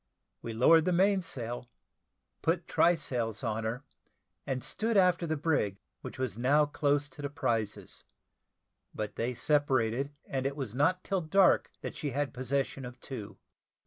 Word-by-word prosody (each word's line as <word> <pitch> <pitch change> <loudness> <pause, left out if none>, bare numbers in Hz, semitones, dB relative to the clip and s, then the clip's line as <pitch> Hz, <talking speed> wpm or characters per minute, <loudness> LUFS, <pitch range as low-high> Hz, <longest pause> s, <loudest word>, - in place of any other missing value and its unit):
We 115 - -5
lowered 160 +8 +5
the 180 - +2
mainsail, 165 - 0 0.7
put 165 +1 0
try 175 +1 +4
sails 120 -7 -3
on 110 -1 -1
her, 120 +5 -3 0.6
and 130 -2 -2
stood 225 0 -1
after 180 -2 +4
the 155 0 -1
brig, 140 -11 0 0.2
which - - -8
was 125 -5 -3
now 145 +5 +4
close 145 0 +1
to 145 - -11
the 140 - -3
prizes: 115 -7 -2 0.9
but 105 -1 -4
they 120 +2 -2
separated, 135 -2 +1
and 135 0 -1
it 140 - -4
was 130 -7 -5
not 165 +8 +2
till 195 -2 -1
dark 185 +4 +4
that - - -5
she 150 - -3
had 140 +1 -2
possession 135 +1 -2
of 125 0 -8
two. 120 -6 -7
135 Hz, 155 wpm, -30 LUFS, 120-160 Hz, 0.9 s, lowered